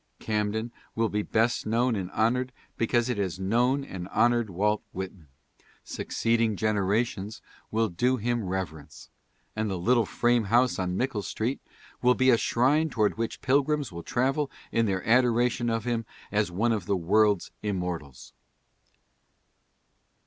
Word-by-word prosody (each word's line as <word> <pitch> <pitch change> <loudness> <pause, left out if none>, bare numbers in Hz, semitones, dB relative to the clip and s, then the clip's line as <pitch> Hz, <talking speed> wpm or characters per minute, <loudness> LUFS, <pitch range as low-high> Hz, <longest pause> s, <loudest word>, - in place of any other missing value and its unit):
Camden 110 +2 -2 0.2
will 115 -1 +1
be 105 +1 0
best 115 +2 0
known 120 +2 +2
and 95 -3 -3
honored 125 +5 +1 0.2
because 120 +1 +1
it 125 -4 -1
has 95 -2 -2
known 120 +8 +1
and 95 -9 -7
honored 120 +1 +2
Walt 105 +4 0
Whitman. 95 -3 -7 0.6
Succeeding 115 -1 0
generations 105 +1 0 0.3
will 110 +1 +1
do 125 +9 +1
him 120 0 -1
reverence, 90 -6 -6 0.4
and 110 0 -1
the 95 - -2
little 115 +4 +2
frame 120 -2 +2
house 120 +3 +3
on 90 0 -1
Mickle 125 -5 -1
street 115 +6 -3 0.4
will 125 0 +4
be 130 0 +4
a 115 - +5
shrine 145 +7 +2
toward 110 -5 +1
which 115 - -3
pilgrims 140 -1 +1
will 85 0 -7
travel 135 - 0 0.2
in 115 -1 +2
their 95 -1 -2
adoration 120 0 +3
of 115 -1 -1
him 115 -2 -1 0.2
as 105 -2 +1
one 105 +7 +1
of 105 -5 -2
the 100 -1 +1
world's 100 +2 +2
immortals. 90 - -4
110 Hz, 145 wpm, -27 LUFS, 100-120 Hz, 0.6 s, a